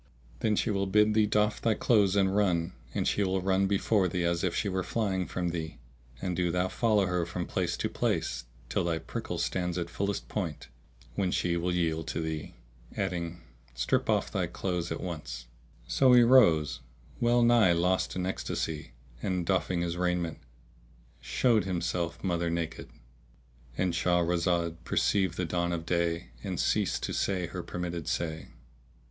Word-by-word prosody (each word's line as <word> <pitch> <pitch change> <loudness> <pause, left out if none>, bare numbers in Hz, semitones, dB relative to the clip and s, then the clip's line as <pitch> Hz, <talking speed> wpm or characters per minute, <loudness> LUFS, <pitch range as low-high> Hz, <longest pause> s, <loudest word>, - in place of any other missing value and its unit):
[FN#647] - - -28
Then 110 -1 +2
she 110 - +1
will 100 -1 0
bid 105 +2 +4
thee 110 0 +4
doff 105 0 +1
thy 110 -2 +2
clothes 105 -4 +3
and 95 -1 +3
run; 90 -4 +1 0.2
and - - 0
she 100 - +2
will 95 0 +1
run 95 +1 +2
before 100 0 +2
thee 90 0 -1
as 85 0 0
if 90 -3 0
she 105 - 0
were 95 -1 0
flying 95 -1 -1
from 90 -1 -2
thee; 80 -2 -4 0.4
and 90 -2 -2
do 90 -1 +1
thou 90 +2 0
follow 110 -3 +2
her 90 -1 0
from 85 +1 -4
place - - -1
to - - -1
place - - -1 0.2
till - - 0
thy 85 -1 0
prickle 80 - -5
stands 90 -1 -1
at 85 -1 -3
fullest 100 +2 -2
point, 85 - -4 0.4
when 95 +8 0
she 90 -1 0
will 85 +1 0
yield 80 -3 0
to - - -2
thee;"[FN#648] 60 -7 -7
adding, 85 -1 -2 0.3
"Strip - - 0
off - - +1
thy - - 0
clothes 90 -3 -3
at - - -2
once." 75 -9 -6 0.4
So 130 - +4
he 120 -1 +8
rose, 105 - +5 0.4
well 120 0 +3
nigh 120 -6 +5
lost 90 +2 +1
in 90 -1 -1
ecstasy 80 -6 -3 0.3
and, 90 -2 -1
doffing 95 -1 +1
his 85 0 -2
raiment, 90 -2 -1 0.8
showed 115 -5 +2
himself 85 -2 -2
mother 85 -2 0
naked.—And 65 -1 -6
Shahrazad 85 0 +1
perceived 95 -5 +1
the 90 - 0
dawn 85 +1 -1
of 85 -1 -3
day 85 -2 0
and - - -3
ceased - - +1
to - - -2
say 95 -3 0
her 90 +1 -5
permitted 85 -1 -5
say. 80 -2 -2
90 Hz, 170 wpm, -29 LUFS, 85-95 Hz, 0.8 s, he